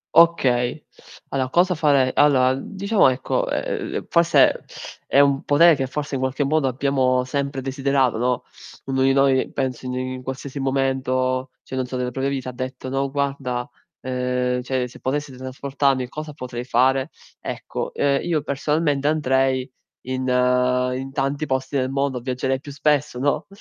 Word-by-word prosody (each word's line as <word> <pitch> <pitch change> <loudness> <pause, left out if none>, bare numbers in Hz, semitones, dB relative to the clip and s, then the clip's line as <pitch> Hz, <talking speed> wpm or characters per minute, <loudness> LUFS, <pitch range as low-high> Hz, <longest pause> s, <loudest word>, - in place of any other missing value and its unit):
Okay. 140 -5 +3 0.4
Allora 130 -2 -1
cosa 180 +6 +3
farei 140 -5 +3
Allora 130 -3 +4
diciamo, 200 +7 +2
ecco, 130 0 -1
ehm, - - -3
forse 170 0 +4 0.4
è 140 - +3
un 140 -1 +4
potere 165 +4 +6
che 135 -1 -2
forse 145 +2 -5
in 130 - -2
qualche 130 +2 0
modo 145 0 +1
abbiamo 130 -1 +1
sempre 140 +1 -3
desiderato, 135 -2 +1
no, 125 0 0 0.4
uno 135 -1 -1
di 135 0 +4
noi 135 -1 +3
penso 130 -1 -3
in 125 - -3
in 130 0 -4
qualsiasi 130 +2 -6
momento, 130 -1 0
cioè, - - -7
non 130 -1 -1
so 130 - -4
nella 125 0 -2
propria 135 +2 -1
vita, 130 -2 -3
ha - - -5
detto: 130 +1 -6
"No 135 +1 -1
guarda", 135 -3 -2 0.3
ehm, 125 -1 -1
"cioè, 125 0 -1
se 125 - -14
potessi 145 +2 -2
teletrasportarmi 130 0 -1
cosa 155 +2 -7
potrei 125 -4 -6
fare?" 130 +2 +2 0.3
Ecco, - - -5
ehm, 140 -1 +2
io 160 -4 -1
personalmente 145 0 0
andrei 130 -3 +1 0.4
in 130 0 -3 0.7
in 135 +1 -5
tanti 140 +1 -1
posti 130 +1 -1
del 130 -1 0
mondo, 135 -1 -1
viaggerei 130 +1 -2
più 145 +1 -10
spesso, 150 -2 +1
no, 145 +4 0
135 Hz, 160 wpm, -22 LUFS, 130-140 Hz, 0.7 s, potere